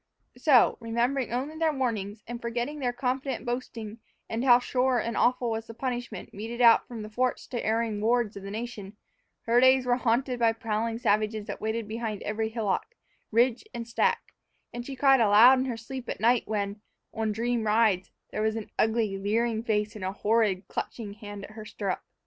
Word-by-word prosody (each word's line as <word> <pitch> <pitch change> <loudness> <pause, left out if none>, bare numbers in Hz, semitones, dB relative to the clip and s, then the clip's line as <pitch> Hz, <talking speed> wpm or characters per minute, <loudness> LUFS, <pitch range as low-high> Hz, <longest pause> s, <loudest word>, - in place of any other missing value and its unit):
So, 250 -1 +4
remembering 240 +2 -1
only 265 +6 -2
their 325 -1 +3
warnings 220 -7 -3
and 240 +1 -6
forgetting 240 +5 -3
their 250 -3 0
confident 260 +2 -2
boasting 235 -3 -5 0.3
and 225 +2 -2
how 245 -2 +7
sure 250 +1 +1
and 235 -2 -2
awful 245 -1 +2
was 225 0 -3
the 225 - -9
punishment 245 -1 -5
meted 225 +4 -6
out 235 -2 +6
from 230 -3 -7
the 215 - -8
forts 250 +3 -1
to 240 - -3
erring 220 -1 0
wards 230 -1 +1
of 200 - -7
the 195 - -7
nation, 215 -2 -6 0.5
her 235 +1 +3
days 260 0 +5
were 245 0 +2
haunted 250 +1 0
by 230 -1 +4
prowling 225 0 -2
savages 215 -1 0
that - - -6
waited 220 0 -2
behind 220 -1 -4
every 220 +1 -2
hillock, 225 - -2 0.4
ridge, 240 - +3
and 230 -1 -5
stack; 235 - 0 0.4
and 240 0 -6
she 275 - -5
cried 270 0 +5
aloud 225 +5 +7
in 260 - 0
her 245 -3 -3
sleep 250 +2 -7
at - - -4
night 235 +3 +3
when, 205 -1 -2 0.3
on 220 -1 -1
dream 230 +1 -1
rides, 210 -4 +2 0.2
there - - -2
was 220 0 +1
ever 225 - -3
an - - -30
ugly, 220 -3 +1
leering 220 +3 0
face 215 -1 -1
and 210 - -7
a 190 +1 -2
horrid, 210 -3 +1
clutching 210 -4 -5
hand 205 -1 -9
at 205 - -9
her 215 0 -9
stirrup. 200 -2 -3
230 Hz, 195 wpm, -28 LUFS, 215-245 Hz, 0.5 s, how